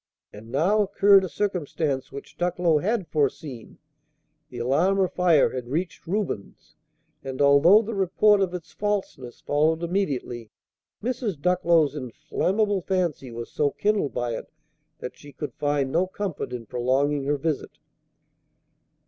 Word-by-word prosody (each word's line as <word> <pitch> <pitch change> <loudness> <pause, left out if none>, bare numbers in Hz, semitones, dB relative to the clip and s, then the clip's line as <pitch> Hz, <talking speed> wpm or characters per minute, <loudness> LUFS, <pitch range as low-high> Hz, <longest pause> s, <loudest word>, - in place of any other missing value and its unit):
And 110 +2 -12
now 185 +11 +2
occurred 200 0 +5
a 185 - -3
circumstance 160 -9 -2
which 140 +1 -10
Ducklow 175 -3 +1
had 200 +1 -1
foreseen. 145 -4 -3 0.7
The 125 - -10
alarm 145 +11 +2
of 190 -2 +1
fire 175 -5 +4
had 125 -2 -5
reached 165 +6 -4
Reuben's; 185 - -4 0.5
and, 135 -1 -6
although 145 +9 +6
the 225 +2 -5
report 195 +1 +3
of 190 -2 +1
its 175 -3 -8
falseness 195 -12 -3
followed 160 +3 +1
immediately, 140 - -2 0.5
Mrs. 230 - -2
Ducklow's 170 -3 +2
inflammable 190 - -1
fancy 175 -8 -1
was 115 0 -7
so 145 -1 +1
kindled 205 -4 -1
by 120 -1 -1
it - - -8 0.5
that 125 - -7
she 145 - -14
could 150 +1 -6
find 145 -2 -1
no 180 +5 +2
comfort 190 -7 -4
in 120 -2 -6
prolonging 135 +5 0
her 145 +1 +1
visit. 150 0 -3
160 Hz, 140 wpm, -25 LUFS, 135-190 Hz, 0.7 s, although